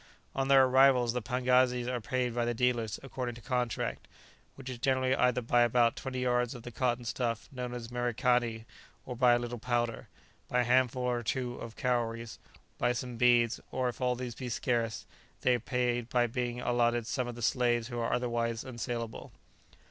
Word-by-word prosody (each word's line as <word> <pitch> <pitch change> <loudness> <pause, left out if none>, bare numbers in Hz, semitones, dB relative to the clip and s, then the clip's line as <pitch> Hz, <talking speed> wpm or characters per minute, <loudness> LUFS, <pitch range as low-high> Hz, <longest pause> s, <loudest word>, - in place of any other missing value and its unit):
On 135 0 -1
their 135 -1 +7
arrival 130 -1 +5
the 120 +1 -1
pagazis 125 0 +2
are 125 -1 -2
paid 125 +1 -1
by 120 0 0
the 120 0 -1
dealers 120 -3 0
according 125 -3 -4
to 120 - -11
contract, 125 -3 -2 0.5
which 135 -1 -11
is 125 -2 -5
generally 130 0 +2
either 125 -1 +2
by 120 +1 +3
about 120 0 +3
twenty 130 -1 -4
yards 125 -1 +1
of 120 - -10
the 120 - -7
cotton 120 0 -1
stuff 115 -1 -2
known 125 -2 -5
as 120 -2 -6
merikani, 120 -1 0 0.4
or 125 - -5
by 120 0 +5
a - - +4
little 120 0 -5
powder, 120 -1 -1 0.4
by 125 - +2
a - - +2
handful 125 0 +2
or 125 -1 0
two 120 +1 -2
of 115 -1 -8
cowries, 115 -2 -2 0.4
by 120 0 +2
some 125 0 -5
beads, 120 -1 +4
or 130 -1 -1
if 120 - -8
all 125 -1 +2
these 125 -1 -5
be 125 +1 -6
scarce, 115 -2 -1 0.4
they 125 - +3
are 120 - +1
paid 120 -1 -1
by 125 -2 +3
being 120 +1 -3
allotted 120 -1 +1
some 125 +2 -2
of 120 - -6
the 120 - -7
slaves 120 -1 +1
who 120 -1 -4
are 115 - -1
otherwise 115 -2 -1
unsalable. 120 -2 -5
120 Hz, 190 wpm, -31 LUFS, 120-125 Hz, 0.5 s, their